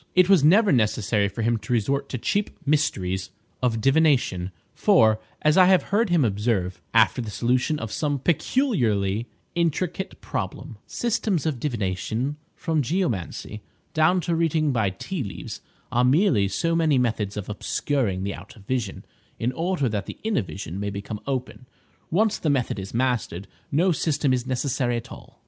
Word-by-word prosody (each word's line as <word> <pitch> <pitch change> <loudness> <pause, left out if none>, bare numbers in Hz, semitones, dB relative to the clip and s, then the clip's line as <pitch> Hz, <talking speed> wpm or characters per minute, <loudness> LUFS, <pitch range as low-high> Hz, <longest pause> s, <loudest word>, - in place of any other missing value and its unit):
It 185 0 +5
was 190 -7 +6
never 200 +8 +5
necessary 105 -4 +2
for 100 +3 -4
him 115 +1 +2
to 105 +3 -4
resort 140 +5 0
to 130 - -3
the - - -14
cheap 205 0 +1 0.2
mysteries 95 -12 0 0.3
of 120 -3 +1
divination; 135 - +2 0.2
for, 110 -1 +4 0.2
as 155 +2 +4
I 185 - +8
have 185 -2 +5
heard 220 0 +3
him 170 -6 +3
observe, 100 -3 -1
after - - +4
the 115 - -5
solution 125 +8 +1
of 115 -6 -5
some 145 +2 -1
peculiarly 125 - +1 0.3
intricate 175 +2 -1
problem— 105 +4 -5
"Systems 215 - -1
of 150 -6 -1
divination, 115 +2 -2 0.2
from 160 -2 0
geomancy 115 - -2 0.3
down 160 +4 +3
to 170 - -1
reading 160 -2 +1
by 110 -6 +1
tea 145 - -5
leaves, 100 - -7 0.3
are 120 - +2
merely 130 - +4
so 165 - 0
many 160 -4 +3
methods 110 -5 0
of 105 - -4
obscuring 105 -2 -1
the 100 0 -2
outer 110 - -12
vision, 115 -2 -3 0.3
in 120 +2 -1
order 165 0 0
that 105 -3 -3
the - - -7
inner 220 -2 +1
vision 95 -1 -6
may 100 0 -2
become 100 +2 -5
open. 130 -1 -4 0.4
Once 215 +5 +2
the 155 - 0
method 130 -7 0
is 95 0 -6
mastered, 115 -7 -1 0.2
no 170 +6 +3
system 150 -4 +1
is 125 0 -1
necessary 130 -1 0
at 115 - -8
all." - - -13
125 Hz, 165 wpm, -24 LUFS, 105-160 Hz, 0.4 s, I